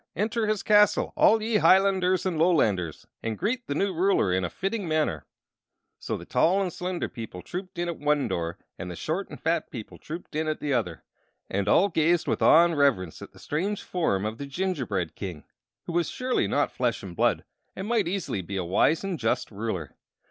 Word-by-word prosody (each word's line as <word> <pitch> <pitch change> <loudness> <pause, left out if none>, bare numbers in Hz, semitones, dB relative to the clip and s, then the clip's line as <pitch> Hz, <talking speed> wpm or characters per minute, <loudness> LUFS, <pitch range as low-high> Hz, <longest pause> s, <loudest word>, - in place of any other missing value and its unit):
Enter 220 +2 0
his 215 -1 0
castle, 210 -1 +4
all 220 0 +4
ye 220 -1 +2
Hilanders 185 -1 +4
and 175 -4 -1
Lolanders, 105 - +2 0.2
and 110 -2 -3
greet 240 +4 -2
the 140 - -2
new 195 +4 0
ruler 175 - +2
in 95 0 +1
a 90 - -1
fitting 195 - -3
manner!" 155 - 0 0.7
So - - -3
the - - -10
tall 185 +4 +3
and 185 -4 -1
slender 180 0 -3
people 110 -7 -8
trooped 185 +1 -7
in 175 0 -1
at 170 - -4
one 145 -3 +1
door 85 -4 -3 0.2
and 90 - -5
the 90 - -6
short 170 - -3
and - - -9
fat 165 0 0
people 115 -5 -9
trooped 165 0 -8
in 155 +1 0
at 155 - -1
the 145 -2 -1
other; 90 -10 -2 0.5
and 100 0 -1
all 185 - +5
gazed 170 -1 +2
with - - 0
awe 170 +2 +7
and 170 -1 0
reverence 125 - +1
at - - -9
the - - -19
strange 190 +7 -2
form 105 - 0
of 110 +1 -4
the 140 - -5
gingerbread 135 - -2
king, 90 -7 -6 0.4
who 170 - -6
was 175 0 +1
surely 255 -1 0
not - - +1
flesh - - -1
and - - -8
blood, - - +2 0.3
and 190 - -5
might 225 -6 +1
easily 175 - -2
be 100 +2 -5
a 90 - -2
wise 150 - +2
and 190 -5 -3
just 115 0 -1
ruler. 100 -7 -4
160 Hz, 205 wpm, -26 LUFS, -, 0.7 s, awe